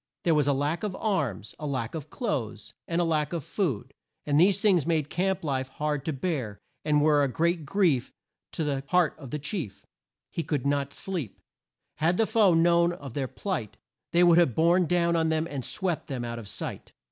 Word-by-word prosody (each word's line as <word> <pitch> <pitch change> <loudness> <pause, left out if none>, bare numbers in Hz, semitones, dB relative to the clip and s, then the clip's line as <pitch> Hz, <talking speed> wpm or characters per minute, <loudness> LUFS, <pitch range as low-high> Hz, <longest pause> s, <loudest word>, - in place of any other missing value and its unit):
There 170 - +3
was 150 -2 +2
a 140 - +4
lack 145 +5 -1
of 210 -4 -3
arms, 140 - -2
a 150 - -4
lack 130 -5 -2
of 155 -2 -6
clothes, 125 - -3
and 170 0 0
a - - +3
lack 155 -2 0
of 165 -4 -2
food, 150 - -2 0.3
and 145 0 +2
these 190 +3 +5
things 185 -8 +3
made 155 -3 0
camp 190 +1 0
life 135 -3 -1
hard 150 0 -2
to 160 - 0
bear, 135 - -3 0.3
and 150 -1 +3
were 150 -1 +4
a - - +3
great 165 +2 0
grief 170 -9 +2 0.4
to 160 - -1
the 140 -2 -1
heart 180 -4 +3
of 135 -5 -9
the 150 - -3
chief. 145 - -4 0.5
He - - -2
could 145 -5 -2
not 140 -1 0
sleep. 170 - -4 0.6
Had 170 +3 +2
the 225 - +3
foe 210 -6 +4
known 170 +1 +4
of 140 -7 -9
their 135 -1 -2
plight, 125 - -4 0.3
they 175 +1 +4
would 175 -1 +6
have 150 -9 +3
borne 170 +2 +4
down 170 0 +2
on 160 -1 +2
them 160 0 +1
and 140 -5 -5
swept 180 +2 -2
them 125 -4 -4
out 115 0 -4
of 110 - -9
sight. - - -6
155 Hz, 205 wpm, -27 LUFS, 140-175 Hz, 0.6 s, would